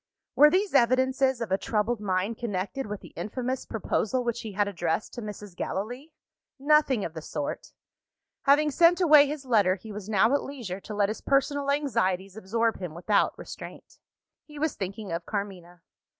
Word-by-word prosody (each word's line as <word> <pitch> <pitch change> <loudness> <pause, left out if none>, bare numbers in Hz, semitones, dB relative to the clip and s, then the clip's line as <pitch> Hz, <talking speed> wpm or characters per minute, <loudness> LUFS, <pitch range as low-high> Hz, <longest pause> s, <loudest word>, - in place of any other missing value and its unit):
Were 295 +1 +8
these 385 +4 +1
evidences 260 0 +3
of 225 -5 -4
a 190 - +2
troubled 220 +1 -1
mind 195 +2 -1
connected 225 +4 -3
with 210 -1 -6
the - - -14
infamous 255 +3 -4
proposal 225 +3 -1
which 235 -1 -2
he 220 -3 -7
had 205 +1 +1
addressed 170 -1 -2
to 240 - -6
Mrs. 210 -3 -8
Gallilee? 245 - -4 0.5
Nothing 280 -5 +3
of 160 - -6
the 160 - -6
sort! 150 -2 -5 0.7
Having 295 +2 +4
sent 340 +5 +5
away 300 -5 +7
his 290 -1 -5
letter, 205 -7 +3
he 215 +3 -11
was 205 0 -7
now 220 +4 +3
at 285 - +2
leisure 235 -10 -6
to 210 +2 -8
let 205 -1 +2
his 215 - -5
personal 280 +1 +1
anxieties 195 -10 0
absorb 225 +2 -1
him 175 -4 -6
without 200 +4 +1
restraint. - - -10 0.4
He 300 -1 -13
was 310 +1 0
thinking 195 +1 -6
of 170 0 -4
Carmina. 180 -5 -5
220 Hz, 175 wpm, -27 LUFS, 195-275 Hz, 0.7 s, Were